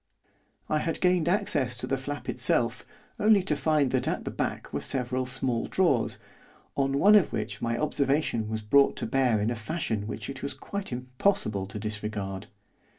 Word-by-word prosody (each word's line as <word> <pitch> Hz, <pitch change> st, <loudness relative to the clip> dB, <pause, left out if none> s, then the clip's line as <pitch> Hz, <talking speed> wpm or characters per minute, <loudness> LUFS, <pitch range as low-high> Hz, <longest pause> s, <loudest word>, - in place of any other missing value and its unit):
I 155 Hz, -, +1 dB
had 165 Hz, +1 st, -2 dB
gained 180 Hz, -2 st, +3 dB
access 140 Hz, -, +1 dB
to -, -, -3 dB
the 135 Hz, -, 0 dB
flap 145 Hz, +2 st, -5 dB
itself 120 Hz, -1 st, 0 dB, 0.3 s
only 210 Hz, -2 st, +5 dB
to 155 Hz, -5 st, 0 dB
find 145 Hz, -1 st, +2 dB
that 130 Hz, -1 st, +1 dB
at -, -, -2 dB
the -, -, -3 dB
back -, -, -3 dB
were -, -, -1 dB
several 130 Hz, 0 st, -1 dB
small 125 Hz, -2 st, -1 dB
drawers, 170 Hz, -11 st, +1 dB, 0.6 s
on 135 Hz, -1 st, +1 dB
one 205 Hz, +8 st, +6 dB
of 205 Hz, -7 st, +5 dB
which 110 Hz, -, -3 dB
my 115 Hz, 0 st, 0 dB
observation 140 Hz, -6 st, 0 dB
was 110 Hz, 0 st, -3 dB
brought 140 Hz, +6 st, +4 dB
to -, -, -2 dB
bear 125 Hz, -2 st, +2 dB
in 105 Hz, +3 st, 0 dB
a -, -, -1 dB
fashion 110 Hz, -4 st, -3 dB
which 105 Hz, 0 st, -5 dB
it 135 Hz, -1 st, -6 dB
was 140 Hz, -, -4 dB
quite 200 Hz, -4 st, -6 dB
impossible 125 Hz, -, 0 dB
to 100 Hz, -, -6 dB
disregard. 105 Hz, -2 st, -4 dB
130 Hz, 180 wpm, -28 LUFS, 110-150 Hz, 0.6 s, one